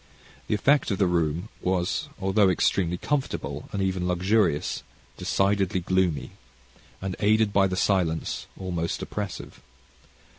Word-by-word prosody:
The - - +1
effect 140 +7 +3
of 100 - 0
the 100 - +3
room 85 +2 0
was, 90 -1 0
although 95 +1 +3
extremely 90 -1 +1
comfortable, 75 - -2
and 100 -1 -1
even 95 -2 -1
luxurious, 90 -5 +1 0.3
decidedly 95 -1 +1
gloomy, 90 -3 0 0.7
and 95 -2 -2
aided 110 0 +3
by 100 -1 +4
the 90 -1 -3
silence, 90 -5 0
almost 85 -3 -2
oppressive. 105 -1 -6
95 Hz, 120 wpm, -26 LUFS, 90-100 Hz, 0.7 s, by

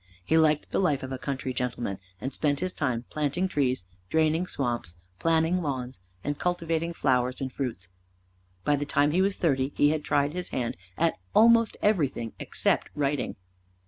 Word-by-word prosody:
He 160 - +2
liked 155 -2 +3
the - - +1
life 150 -8 +1
of 130 - -5
a 130 - -4
country 135 -1 -3
gentleman, 120 -5 -2 0.2
and 135 - -4
spent 145 -2 +1
his 185 0 -2
time 125 -5 -1
planting 150 +5 0
trees, 130 - 0 0.2
draining 160 - +2
swamps, 120 - -2 0.2
planning 165 +2 +2
lawns, 130 - -4 0.2
and 145 0 -2
cultivating 170 -2 0
flowers 130 -5 +1
and 130 -1 -4
fruits. 120 -10 -3 0.8
By 145 +6 +3
the 145 - -2
time 145 +1 +3
he 180 +4 +3
was 195 0 +1
thirty 135 -4 +1
he 145 - +5
had 155 -1 0
tried 145 0 +1
his 180 0 -4
hand 120 -2 -2 0.2
at 165 - +1 0.2
almost 230 0 +6
everything 145 - +1
except - - 0
writing. 145 -2 -1
145 Hz, 170 wpm, -27 LUFS, 130-165 Hz, 0.8 s, almost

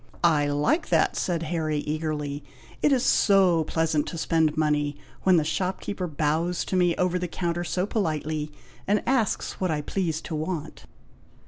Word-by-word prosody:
"I 155 -4 +4
like 145 - +1
that!" - - +3
said 170 -2 -1
Harry, 155 -2 -1
eagerly; 150 -2 -3 0.4
"it 295 - +3
is 260 -1 +2
so 190 -5 +4
pleasant 160 -2 0
to 170 - -5
spend 160 -2 +1
money, 150 -2 +1 0.2
when 185 -2 +4
the 160 - +3
shopkeeper 185 +3 -2
bows 160 +3 0
to - - -2
me 175 -2 +3
over 180 0 +1
the 180 - -2
counter 175 0 -2
so 180 +2 -1
politely, 155 -7 -2 0.4
and 205 +2 +2
asks 245 -7 0
what 185 - +1
I 155 -2 0
please 165 0 -2
to - - -7
want." 155 0 -4
165 Hz, 160 wpm, -26 LUFS, 150-180 Hz, 0.4 s, I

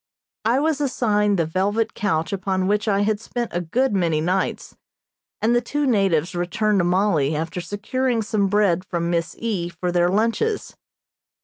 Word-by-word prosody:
I 235 +4 +3
was 300 -1 0
assigned 210 -7 +1
the 165 - +1
velvet 200 +7 0
couch 165 -4 -1
upon 190 -1 -1
which 210 +2 0
I 200 -1 +2
had 210 0 +1
spent 240 +1 -4
a 175 - -1
good 230 +9 0
many 170 -5 +1
nights, 185 +4 -1 0.7
and 235 +2 +3
the 240 - +3
two 290 +5 -2
natives 195 - +2
returned 190 +4 0
to - - +2
Mollie 175 -5 +2
after 165 +3 -3
securing 225 +6 -1
some 205 -1 0
bread 195 -3 +2
from 170 -2 -2
Miss 170 -1 -1
E. 200 -7 -2
for 175 +1 -3
their 175 0 +2
lunches. 230 - 0
200 Hz, 170 wpm, -22 LUFS, 175-225 Hz, 0.7 s, I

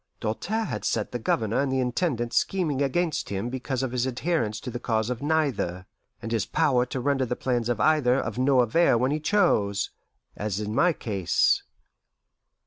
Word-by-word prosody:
Doltaire 200 - -2
had - - -4
set 110 -2 -1
the 120 - -3
Governor 110 -1 0
and 140 -1 0
the 130 - +1
Intendant 125 -2 -1
scheming 160 -8 0
against 155 +4 0
him 100 +4 -3
because 130 0 -3
of 130 - -2
his 125 0 0
adherence 125 -5 -1
to 125 - -6
the 120 - -4
cause 110 -1 -1
of 125 - -4
neither, 140 - 0 0.4
and 115 - -5
his 115 -3 +1
power 130 -6 +2
to 130 - -4
render 135 +1 +1
the 125 - -1
plans 120 -2 -1
of 120 - 0
either 150 -6 +3
of 110 0 -4
no 130 0 +4
avail 120 +3 +3
when 130 +3 +1
he 150 - 0
chose, 130 - +1 0.4
as 105 -1 -3
in 105 0 -3
my 170 +9 +4
case. 100 - +1
125 Hz, 185 wpm, -26 LUFS, 110-145 Hz, 0.4 s, no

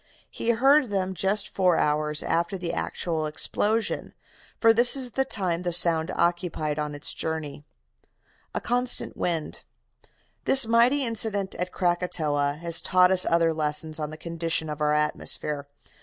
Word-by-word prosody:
He - - -7
had 235 - +2
heard 270 +1 +4
them 190 -2 -2
just 195 +4 -1
four 180 -3 +1
hours 150 0 0
after 170 +4 -1
the 175 -2 -4
actual 160 -2 -3
explosion, 215 +8 -2 0.4
for 225 -1 +5
this 240 +3 +5
is 255 -3 -3
the 265 +2 0
time 180 -8 -2
the 175 -1 -2
sound 165 -2 +3
occupied 170 -3 -1
on 150 -1 -4
its 145 - 0
journey. 155 -2 -5 0.9
A - - 0
CONSTANT 245 +1 -1
WIND 165 -3 -3 0.8
"This 270 -2 +8
mighty 240 +5 +3
incident 210 -4 0
at 180 0 -4
Krakatoa 155 -5 -1
has 170 -1 +2
taught 185 0 +3
us 185 -1 +3
other 165 -1 +2
lessons 155 +1 -2
on 150 -1 -4
the 155 - -9
constitution 165 -1 -2
of 150 0 -7
our 150 0 +2
atmosphere. 150 -1 -1
170 Hz, 155 wpm, -25 LUFS, 155-205 Hz, 0.9 s, This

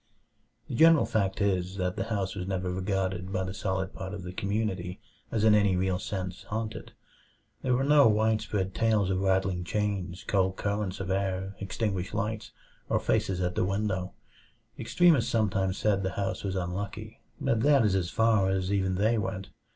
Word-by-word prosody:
The - - -6
general 160 +4 +6
fact 100 -2 -1
is, 95 -2 0
that 90 -1 -1
the - - -2
house 100 -4 -2
was 95 -2 -5
never 95 -1 -2
regarded 95 -1 -2
by 95 -1 -1
the 95 0 -4
solid 95 -3 -2
part 95 +1 -6
of 95 - -7
the 90 0 -7
community 100 -2 -2 0.3
as 110 -2 0
in 110 -1 +6
any 100 -3 +4
real 90 0 0
sense 95 -2 -4
"haunted." 110 +1 -5 0.7
There 125 -1 +1
were 130 - +1
no 145 -1 +6
widespread 105 -3 +1
tales 110 -4 +2
of 95 - 0
rattling 95 -2 +1
chains, 95 -2 -2
cold 95 -2 +1
currents 100 -2 -2
of 95 -1 -3
air, 95 0 -1
extinguished 100 -1 -2
lights, 110 0 -2 0.4
or - - +2
faces 90 -1 0
at 90 0 0
the - - 0
window. 95 -1 -1 0.7
Extremists 130 +1 +3
sometimes 100 -5 +1
said 100 -2 +1
the 95 -1 -2
house 100 -1 -2
was 95 -1 -2
"unlucky," 95 +2 -4 0.2
but 115 - +1
that 140 -3 +5
is 100 - +2
as 90 -3 0
far 110 -2 +3
as 95 0 0
even 95 -2 +1
they 110 +4 +2
went. 95 -1 -4
95 Hz, 175 wpm, -28 LUFS, 95-105 Hz, 0.7 s, general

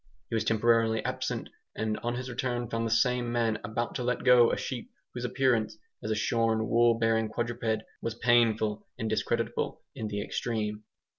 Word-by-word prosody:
He - - 0
was 110 - +1
temporarily 110 0 +3
absent, - - -2 0.3
and 110 0 -1
on 120 +1 -2
his 125 +1 -4
return 120 -1 -2
found 115 +1 -1
the - - -2
same 120 +1 +2
man 115 -2 +1
about 110 +3 -2
to 125 - -3
let 125 0 -1
go 125 -2 +6
a - - 0
sheep 125 -3 -5 0.2
whose 125 0 -4
appearance, 120 -4 +1 0.2
as 110 - -4
a 110 - +1
shorn 110 0 +1
wool 115 0 +4
bearing 115 -1 +2
quadruped, 115 -1 -2 0.2
was 115 -1 -3
painful 115 -3 +2
and 110 - -2
discreditable 110 0 -1
in 110 - -4
the 105 -1 -3
extreme. 105 -2 -3
115 Hz, 175 wpm, -29 LUFS, 110-120 Hz, 0.3 s, go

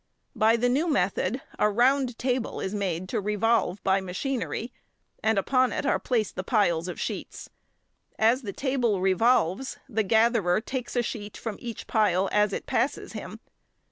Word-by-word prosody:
By 220 +1 +4
the 245 +2 +2
new 280 +7 +1
method 250 -3 0 0.2
a 210 - +4
round 250 +2 +2
table 250 -2 -1
is 190 - -3
made 185 -3 -2
to - - -1
revolve 210 -1 +1
by 195 0 +2
machinery, 235 +5 -3 0.5
and 220 -1 +2
upon 255 +5 +2
it - - -2
are - - +2
placed 225 -5 -1
the 185 - -3
piles 180 -6 +1
of 180 - -6
sheets. - - -5 0.7
As 230 +4 +3
the 210 -6 -5
table 245 -4 0
revolves 195 +4 +2
the 220 -4 0
gatherer 220 -3 +3
takes 250 +2 -5
a 245 - +2
sheet 210 -2 -6
from 220 -3 -5
each 235 -2 -7
pile 195 -3 +2
as 210 0 +3
it - - -4
passes - - -1
him. - - -8
220 Hz, 165 wpm, -26 LUFS, 195-245 Hz, 0.7 s, By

